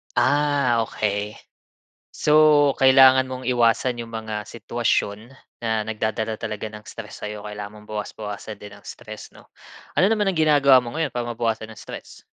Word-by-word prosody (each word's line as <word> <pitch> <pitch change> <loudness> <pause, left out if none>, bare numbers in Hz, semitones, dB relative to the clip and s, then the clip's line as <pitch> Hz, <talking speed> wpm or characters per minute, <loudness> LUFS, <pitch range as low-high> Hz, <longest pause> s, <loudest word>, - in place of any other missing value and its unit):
Ah, 145 -4 +2
okey, 105 0 -2 0.8
so, 150 -2 +4
kailangan 130 0 +6
mong 130 -1 -6
iwasan 120 0 +2
'yong 115 - -12
mga 110 -1 -5
sitwasyon 115 -1 -2 0.3
na 110 -1 -1
nagdadala 110 0 -2
talaga 110 -1 -5
ng 105 0 -11
stress 110 -2 -10
sayo, 105 0 -6
kailangan 105 0 -8
mong 105 - -18
bawas-bawasan 105 0 -6
din 105 0 -11
ang 100 - -18
stress, 110 -3 -10
'no? - - -18 0.5
Ano 195 +4 +4
naman 210 -2 +1
ang 190 - 0
ginagawa 140 -5 +5
mo 120 +7 -6
ngayon 150 -7 -2
para 120 -1 -2
mabawasan 110 -1 -2
ang 110 - -12
stress? - - -10
115 Hz, 155 wpm, -23 LUFS, 105-130 Hz, 0.8 s, kailangan